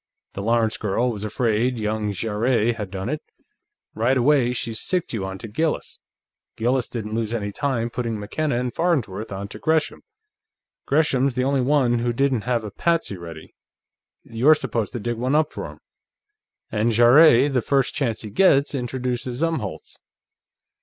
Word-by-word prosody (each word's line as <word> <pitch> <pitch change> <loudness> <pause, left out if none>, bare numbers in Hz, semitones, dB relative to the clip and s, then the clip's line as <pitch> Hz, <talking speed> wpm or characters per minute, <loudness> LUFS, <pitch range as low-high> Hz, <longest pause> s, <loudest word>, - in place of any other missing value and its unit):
"The 100 - -5
Lawrence 115 +1 +1
girl 110 +4 0
was 105 -2 -6
afraid 115 +3 0
young 105 -1 -1
Jarrett 115 +3 0
had 105 -4 -5
done 95 +1 -5
it; 150 +4 -3 0.7
right 120 +5 +1
away, 130 -1 +3
she 120 -1 -1
sicced 175 +10 -1
you 110 -4 -2
onto 95 +3 -6
Gillis. 155 +9 -2 0.6
Gillis 125 +2 0
didn't 110 -3 -5
lose 115 0 -1
any 105 -3 -3
time 120 -1 -2
putting 115 -3 -3
McKenna 120 +5 -2
and 125 -1 -3
Farnsworth 125 - -1
onto 100 +2 -6
Gresham. 160 +3 0 0.9
Gresham's 140 -3 +2
the 125 - 0
only 135 0 +1
one 125 -3 +2
who 120 +1 0
didn't 130 -3 0
have 120 -2 +1
a 105 - -6
patsy 165 - 0
ready; 85 -3 -10 0.7
you're 130 +8 +4
supposed 115 -7 -2
to 120 - -3
dig 120 +2 -3
one 130 +4 0
up 155 0 +2
for - - -5
him. - - -14 0.9
And 110 +2 +1
Jarrett, 125 +4 +6
the 125 - +2
first 135 +1 +1
chance 120 -7 -1
he 105 - -7
gets, 140 - +3
introduces 125 +1 -3
Umholtz." 160 - -3
120 Hz, 160 wpm, -23 LUFS, 110-135 Hz, 0.9 s, Jarrett